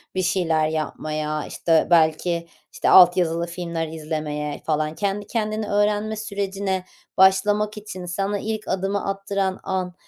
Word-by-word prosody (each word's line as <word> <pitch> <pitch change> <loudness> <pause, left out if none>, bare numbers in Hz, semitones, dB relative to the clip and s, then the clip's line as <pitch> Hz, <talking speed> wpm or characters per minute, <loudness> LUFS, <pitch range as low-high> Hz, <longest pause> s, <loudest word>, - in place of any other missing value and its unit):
bir 185 - +1
şeyler 165 -4 +1
yapmaya? 155 -1 -3
İşte, 165 -2 +2
belki, 170 +1 +2 0.2
işte, - - 0
alt 180 0 +8
yazılı 170 -1 +1
filmler 170 -2 -4
izlemeye 155 -2 -4
falan. 155 0 0
Kendi 205 +1 -2
kendine 215 -1 -2
öğrenme 210 +1 +1
sürecine 200 -3 -3 0.3
başlamak 205 +3 +3
için 185 -4 -7
sana 195 +3 -2
ilk 215 0 -4
adımı 195 +1 -1
attıran 195 -1 -2
an, 185 -1 -2
185 Hz, 130 wpm, -23 LUFS, 160-200 Hz, 0.3 s, alt